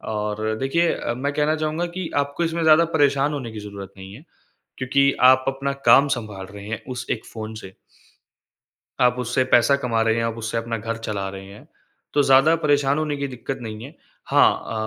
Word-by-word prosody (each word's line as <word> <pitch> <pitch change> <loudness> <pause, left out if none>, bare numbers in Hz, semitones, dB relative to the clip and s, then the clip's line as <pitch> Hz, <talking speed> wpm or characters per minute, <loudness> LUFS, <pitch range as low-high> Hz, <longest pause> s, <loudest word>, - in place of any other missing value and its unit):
और 105 +1 -2
देखिए 165 +6 +1
अ, - - -3
मैं 140 +2 -2
कहना 150 +1 +1
चाहूँगा 155 +2 -2
कि 180 -3 -4
आपको 140 +4 -1
इसमें 165 0 -1
ज़्यादा 160 +1 +6
परेशान 140 0 +2
होने 130 -5 -5
की 110 - -7
ज़रूरत 100 -1 -9
नहीं 95 0 -10
है, 140 - -14 0.6
क्योंकि 140 +2 +2 0.2
आप 130 0 +1
अपना 135 +1 -2 0.2
काम 140 +4 +7
सँभाल 100 -4 -8
रहे 100 0 -9
हैं 115 - -5
उस 125 0 -6
एक 110 - -2
फ़ोन 110 -1 -7
से 95 0 -11 1.3
आप 125 -1 +4
उससे 125 +1 0
पैसा 120 +3 +5
कमा 125 -5 -1
रहे 115 0 +2
हैं, 115 - 0
आप 115 0 -2
उससे 115 0 -3
अपना 115 0 -3
घर 115 +1 -4
चला 105 -3 -4
रहे 95 0 -9
हैं, 100 +2 -14 0.5
तो 145 - +4
ज़्यादा 135 +5 +5
परेशान 145 -2 +1
होने 150 -2 -2
की 140 - -2
दिक्कत 130 +1 -6
नहीं 110 0 -7
है। 145 +5 -10 0.3
हाँ 110 -1 +2
125 Hz, 200 wpm, -22 LUFS, 110-145 Hz, 1.3 s, काम